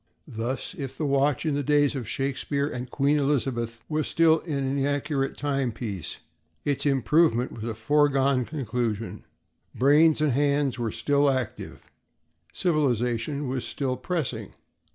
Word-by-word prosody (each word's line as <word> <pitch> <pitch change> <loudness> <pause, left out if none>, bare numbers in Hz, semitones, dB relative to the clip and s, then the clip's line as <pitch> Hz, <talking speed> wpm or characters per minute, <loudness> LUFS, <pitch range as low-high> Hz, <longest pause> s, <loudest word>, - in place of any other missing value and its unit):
Thus, 120 +8 -4
if 140 -7 -6
the 155 - -1
watch 140 +1 +1
in 155 - +1
the 145 - 0
days 145 0 +3
of 125 -6 -5
Shakespeare 140 +1 -1
and 125 -3 -5
Queen 145 +1 +2
Elizabeth 120 -5 -1
was 155 -1 -1
still 165 -1 +4
an 140 -2 -1
inaccurate 140 0 -1
timepiece, 120 - -3 0.5
its 145 0 0
improvement 135 -2 +3
was 110 - -8
a 115 -2 -3
foregone 135 +1 +2
conclusion. 115 -6 -3 0.5
Brains 150 +4 +5
and 150 -2 +2
hands 140 -1 +1
were 115 -2 -1
still 145 +3 +2
active; 130 -4 -3 0.7
civilization 140 - 0
was 130 -1 -2
still 130 -3 -2
pressing. 130 - -3
140 Hz, 130 wpm, -26 LUFS, 125-145 Hz, 0.7 s, Brains